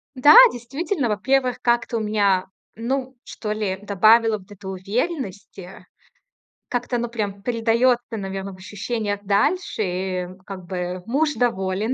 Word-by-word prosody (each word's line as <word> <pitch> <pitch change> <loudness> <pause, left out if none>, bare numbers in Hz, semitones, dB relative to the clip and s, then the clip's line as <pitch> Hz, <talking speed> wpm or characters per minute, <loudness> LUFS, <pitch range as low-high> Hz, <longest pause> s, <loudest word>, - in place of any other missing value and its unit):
Да, 265 +3 +7 0.2
действительно, 275 - -3
во-первых, 250 +5 +1
как-то 235 0 +1
у - - -3
меня, 205 -3 +1 0.3
ну, 260 +3 -3
что 210 -2 -5
ли, 205 -3 -2
добавило 215 +2 +4
вот 190 +1 -19
это 205 -1 -10
уверенности. 195 - -5 0.8
Как-то 245 0 -2
оно 240 0 -2
прям 205 -4 -4
передаётся, 235 +2 +2
наверно, 195 -1 -5
в - - -13
ощущениях 205 +2 -4
дальше. 215 - 0
И 185 -1 -2 0.2
как 190 -2 -8
бы 180 0 -4
муж 295 +6 +1
доволен, 210 -2 0
215 Hz, 130 wpm, -22 LUFS, 195-245 Hz, 0.8 s, Да